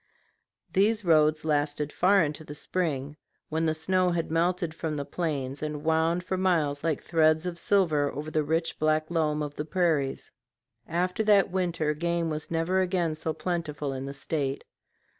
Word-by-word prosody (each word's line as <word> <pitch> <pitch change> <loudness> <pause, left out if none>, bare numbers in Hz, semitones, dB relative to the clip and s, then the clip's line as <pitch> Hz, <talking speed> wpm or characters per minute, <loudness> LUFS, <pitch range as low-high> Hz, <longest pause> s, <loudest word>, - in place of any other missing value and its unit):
These 210 +2 +2
roads 155 -1 +4
lasted 150 -1 0
far 195 0 +4
into 150 +1 -3
the 150 -1 -9
spring, 150 -4 -2 0.3
when 160 +1 0
the 155 - +1
snow 185 +3 +1
had 170 -2 -2
melted 170 0 +1
from 160 -2 -3
the 140 - -3
plains, 140 -4 -3
and 150 -1 -4
wound 160 +2 +2
for 185 +1 -2
miles 160 -6 +1
like 160 -4 -1
threads 160 0 +3
of 175 -1 -4
silver 160 -9 +2
over 150 +2 -6
the 155 -1 +1
rich 165 +2 -1
black 155 +1 +1
loam 155 -2 +1
of 145 -1 -5
the 150 - -4
prairies. 155 -5 0 0.6
After 180 +5 0
that 205 -4 +4
winter 170 -5 0
game 170 +1 -1
was 155 0 -4
never 170 +3 +1
again 180 -3 0
so 160 +1 -3
plentiful 155 -4 -3
in 130 0 -5
the 140 - -5
State. 140 -1 -2
160 Hz, 170 wpm, -27 LUFS, 150-175 Hz, 0.6 s, roads